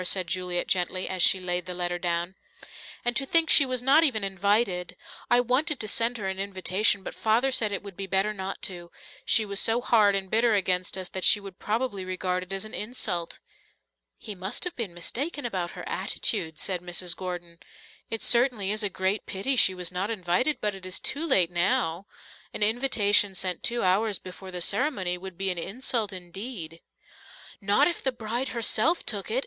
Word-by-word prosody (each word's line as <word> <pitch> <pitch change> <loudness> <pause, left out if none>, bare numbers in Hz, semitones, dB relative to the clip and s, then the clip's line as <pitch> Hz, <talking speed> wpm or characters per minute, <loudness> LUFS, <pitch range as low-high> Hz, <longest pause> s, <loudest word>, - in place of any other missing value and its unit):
said 185 0 +1
Juliet 180 +1 -2
gently, 185 0 0
as 185 -1 -3
she 190 - +6
laid 180 0 -2
the 180 - -4
letter 175 0 -2
down. 175 +1 -2 0.7
"And 240 0 +1
to 270 - +1
think 325 +4 +3
she 280 - +8
was 255 -1 -2
not 280 +5 +5
even 235 -9 +2
invited! 195 -1 0 0.3
I 245 - +5
wanted 260 +4 0
to 215 - -1
send 230 +3 +1
her 200 -3 -4
an 190 0 -4
invitation, 195 +1 +1
but - - -6
Father 230 +5 +1
said 220 -4 +2
it 200 - -3
would 200 -3 -10
be 195 +1 -5
better 195 +3 0
not 190 -1 -6
to 175 -2 -5 0.4
she 220 - +4
was 200 -1 -1
so 225 +1 +3
hard 215 -5 +3
and 195 -1 -1
bitter 225 0 +3
against 185 -1 0
us 185 -1 -4
that 190 - -5
she 210 - +6
would 195 -2 -11
probably 215 -3 -2
regard 185 0 -2
it 185 +1 -9
as 195 +1 -2
an 215 - -10
insult." 200 -7 -2 0.8
"He 215 - -7
must 190 +1 -4
have 360 -1 -1
been 205 -8 -5
mistaken 275 - -3
about 185 -7 -3
her - - -7
attitude," 165 -8 -1
said 180 0 -1
Mrs. 175 0 0
Gordon. 175 -2 -7 0.5
"It 225 - -2
certainly 235 -5 +3
is 215 +1 0
a 205 - 0
great 190 +2 -2
pity 230 +8 0
she 190 -5 +4
was 180 -1 -3
not 185 +3 -2
invited, 210 - 0
but 210 -1 -1
it 195 -1 -11
is 185 - -2
too 310 +4 -2
late 180 - +4
now. 175 +1 0 0.5
An - - +1
invitation 210 -4 +3
sent 180 -1 -1
two 235 0 0
hours 200 +2 +2
before 185 +1 -11
the 180 -1 -5
ceremony 185 - 0
would 190 -1 -9
be 195 0 0
an 175 - -3
insult 225 +1 -2
indeed." 180 -2 -7 0.8
"Not 205 +9 +3
if 345 - -3
the 265 - 0
bride 240 +2 -3
herself 240 +8 +1
took 205 -4 -3
it!" 235 +4 +1
195 Hz, 195 wpm, -26 LUFS, 180-230 Hz, 0.8 s, she